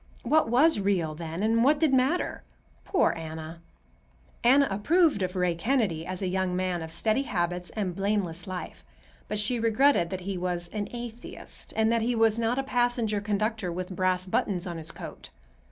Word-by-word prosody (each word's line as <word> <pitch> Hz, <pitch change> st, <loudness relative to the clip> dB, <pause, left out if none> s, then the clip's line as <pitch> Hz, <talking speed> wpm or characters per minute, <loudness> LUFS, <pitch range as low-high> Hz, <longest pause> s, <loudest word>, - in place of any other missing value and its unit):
What 300 Hz, 0 st, +3 dB
was 270 Hz, +2 st, +4 dB
real, 190 Hz, -6 st, 0 dB
then, 165 Hz, +3 st, -5 dB
and 225 Hz, +1 st, +3 dB
what 290 Hz, +3 st, +4 dB
did 310 Hz, -4 st, +3 dB
matter? 265 Hz, +7 st, +1 dB, 0.4 s
Poor 380 Hz, -, +3 dB
Anna! 160 Hz, 0 st, -7 dB, 0.8 s
Anna 275 Hz, +4 st, +5 dB
approved 295 Hz, -, +3 dB
of 185 Hz, 0 st, -2 dB
Ray 180 Hz, -1 st, +1 dB
Kennedy 180 Hz, -4 st, 0 dB
as 185 Hz, +1 st, -4 dB
a -, -, 0 dB
young 185 Hz, 0 st, 0 dB
man 180 Hz, -2 st, -1 dB
of 160 Hz, -, -6 dB
steady 215 Hz, +9 st, +1 dB
habits 180 Hz, -8 st, -2 dB
and 195 Hz, -5 st, -2 dB
blameless 195 Hz, -3 st, -1 dB
life, 185 Hz, -1 st, -6 dB, 0.4 s
but 210 Hz, -, -2 dB
she 215 Hz, +4 st, +1 dB
regretted 230 Hz, -4 st, +3 dB
that 185 Hz, 0 st, -4 dB
he 190 Hz, 0 st, -4 dB
was 175 Hz, -1 st, -2 dB
an 205 Hz, +1 st, -3 dB
atheist, 240 Hz, 0 st, -8 dB
and 220 Hz, 0 st, +3 dB
that 230 Hz, -1 st, +2 dB
he 240 Hz, +2 st, 0 dB
was 225 Hz, 0 st, +3 dB
not 230 Hz, +2 st, +1 dB
a 270 Hz, -, 0 dB
passenger 240 Hz, -5 st, 0 dB
conductor 210 Hz, -1 st, -1 dB
with 180 Hz, +2 st, -5 dB
brass 185 Hz, 0 st, +1 dB
buttons 185 Hz, 0 st, -1 dB
on 170 Hz, -2 st, -5 dB
his 160 Hz, +1 st, -6 dB
coat. -, -, -9 dB
200 Hz, 180 wpm, -27 LUFS, 180-235 Hz, 0.8 s, Anna